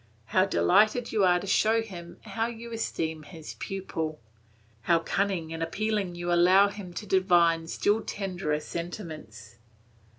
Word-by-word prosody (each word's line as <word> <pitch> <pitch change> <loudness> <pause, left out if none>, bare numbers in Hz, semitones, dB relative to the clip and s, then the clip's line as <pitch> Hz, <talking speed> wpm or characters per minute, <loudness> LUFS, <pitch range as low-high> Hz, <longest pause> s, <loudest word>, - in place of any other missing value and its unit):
How 185 - +5
delighted 215 +7 +3
you 215 -3 +2
are 180 -1 +4
to - - -7
show 220 +3 +3
him 175 -5 -10
how 225 0 -2
you 235 0 -8
esteem 160 -8 -2
his 160 0 -10
pupil! 160 -5 -4 0.7
How 170 - +6
cunningly 170 -1 -1
and 165 - -5
appealingly 195 +1 -1
you 175 0 -1
allow 185 +4 +6
him 200 -3 -8
to 210 - -5
divine 175 -4 +3
still 205 +6 +1
tenderer 180 -8 -2
sentiments. 155 - -7
180 Hz, 140 wpm, -28 LUFS, 165-205 Hz, 0.7 s, How